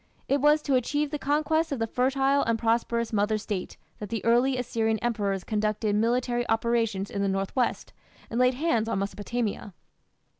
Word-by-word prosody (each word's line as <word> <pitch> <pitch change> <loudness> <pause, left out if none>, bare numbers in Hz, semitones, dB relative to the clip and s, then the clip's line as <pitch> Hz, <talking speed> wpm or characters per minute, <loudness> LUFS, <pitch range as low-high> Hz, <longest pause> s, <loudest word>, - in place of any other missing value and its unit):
It 280 0 +1
was 300 +1 +4
to 280 - 0
achieve 290 +4 0
the 295 - -3
conquest 310 +3 +1
of 280 - -1
the 225 - 0
fertile 270 +4 +1
and 230 0 +1
prosperous 235 0 0
mother 210 +1 +1
State 205 -3 -5 0.2
that 210 - -6
the 225 -1 -4
early 245 +3 +3
Assyrian 225 -2 0
emperors 205 -5 -1
conducted 215 0 -1
military 240 +2 +1
operations 225 -3 0
in 200 - -2
the 200 - +1
north 195 0 -2
west 255 -2 -1 0.3
and 230 - -3
laid 250 0 +4
hands 240 -7 0
on 230 - -1
Mesopotamia. 205 0 -3
230 Hz, 175 wpm, -27 LUFS, 215-255 Hz, 0.3 s, was